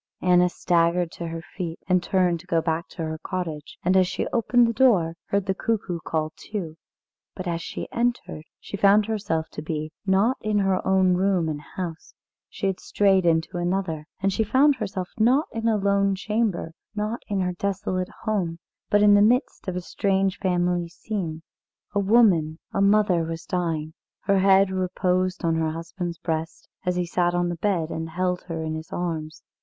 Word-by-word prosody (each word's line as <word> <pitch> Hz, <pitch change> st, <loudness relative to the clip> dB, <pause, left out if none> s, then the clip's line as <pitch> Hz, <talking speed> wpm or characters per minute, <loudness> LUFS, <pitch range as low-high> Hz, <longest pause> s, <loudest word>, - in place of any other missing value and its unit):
Anna 180 Hz, 0 st, +4 dB
staggered 170 Hz, 0 st, +1 dB
to 170 Hz, -, -6 dB
her 165 Hz, 0 st, -6 dB
feet, 170 Hz, -2 st, -6 dB
and 185 Hz, -1 st, +3 dB
turned 180 Hz, -2 st, +1 dB
to 180 Hz, -, -16 dB
go 170 Hz, -2 st, +2 dB
back 165 Hz, 0 st, -1 dB
to 165 Hz, -, -6 dB
her 160 Hz, 0 st, -4 dB
cottage, 165 Hz, -6 st, -5 dB
and 185 Hz, +1 st, +3 dB
as 185 Hz, -1 st, +5 dB
she -, -, -2 dB
opened 240 Hz, 0 st, +4 dB
the 230 Hz, -, 0 dB
door, 205 Hz, -10 st, +3 dB
heard 200 Hz, -1 st, 0 dB
the 190 Hz, -, +1 dB
cuckoo 195 Hz, -4 st, -2 dB
call 155 Hz, -1 st, -2 dB
two. 180 Hz, -7 st, -6 dB, 0.6 s
But, 185 Hz, -, -5 dB
as 170 Hz, -1 st, -2 dB
she -, -, -5 dB
entered, 235 Hz, -9 st, -2 dB
she -, -, -7 dB
found 205 Hz, +1 st, +5 dB
herself 200 Hz, -8 st, -2 dB
to -, -, -7 dB
be, 155 Hz, 0 st, -4 dB
not 200 Hz, +6 st, +2 dB
in 215 Hz, 0 st, 0 dB
her 195 Hz, -2 st, +2 dB
own 190 Hz, -1 st, +4 dB
room 185 Hz, -2 st, +2 dB
and 150 Hz, -2 st, -3 dB
house 165 Hz, +2 st, -7 dB, 0.3 s
she -, -, -5 dB
had 190 Hz, -1 st, 0 dB
strayed 195 Hz, -3 st, +2 dB
into 165 Hz, +2 st, +1 dB
another, 175 Hz, -4 st, -2 dB
and 195 Hz, 0 st, +1 dB
she 220 Hz, -, +1 dB
found 270 Hz, +6 st, +4 dB
herself 195 Hz, -5 st, -3 dB
not 255 Hz, +8 st, +4 dB
in 225 Hz, 0 st, -2 dB
a 220 Hz, -2 st, +3 dB
lone 200 Hz, -1 st, +2 dB
chamber, 210 Hz, -4 st, -1 dB, 0.2 s
not 215 Hz, +3 st, -2 dB
in 200 Hz, -2 st, -1 dB
her 180 Hz, -1 st, -1 dB
desolate 185 Hz, -1 st, -2 dB
home, 190 Hz, -7 st, -1 dB, 0.3 s
but 205 Hz, 0 st, +4 dB
in 205 Hz, -1 st, +7 dB
the 205 Hz, -, +6 dB
midst 240 Hz, +1 st, +2 dB
of 185 Hz, -, -2 dB
a 180 Hz, -, -2 dB
strange 195 Hz, +1 st, 0 dB
family 175 Hz, -2 st, 0 dB
scene. 170 Hz, -3 st, -5 dB, 0.5 s
A 205 Hz, -, +2 dB
woman, 195 Hz, -7 st, +4 dB, 0.2 s
a 195 Hz, -, +1 dB
mother, 200 Hz, -3 st, +4 dB
was 165 Hz, +1 st, -5 dB
dying. 160 Hz, -3 st, -2 dB, 0.3 s
Her 195 Hz, -1 st, +2 dB
head 195 Hz, 0 st, +5 dB
reposed 185 Hz, 0 st, 0 dB
on 165 Hz, -, +2 dB
her 160 Hz, -1 st, +1 dB
husband's 170 Hz, +2 st, -5 dB
breast 160 Hz, 0 st, -4 dB, 0.2 s
as 180 Hz, -, +2 dB
he 180 Hz, 0 st, 0 dB
sat 175 Hz, 0 st, +1 dB
on 175 Hz, 0 st, +1 dB
the 175 Hz, -, -3 dB
bed 175 Hz, -6 st, 0 dB
and 160 Hz, 0 st, -4 dB
held 180 Hz, +2 st, -1 dB
her 165 Hz, -2 st, -4 dB
in 155 Hz, 0 st, -3 dB
his 160 Hz, 0 st, -7 dB
arms. 160 Hz, -2 st, -4 dB
180 Hz, 190 wpm, -25 LUFS, 165-200 Hz, 0.6 s, in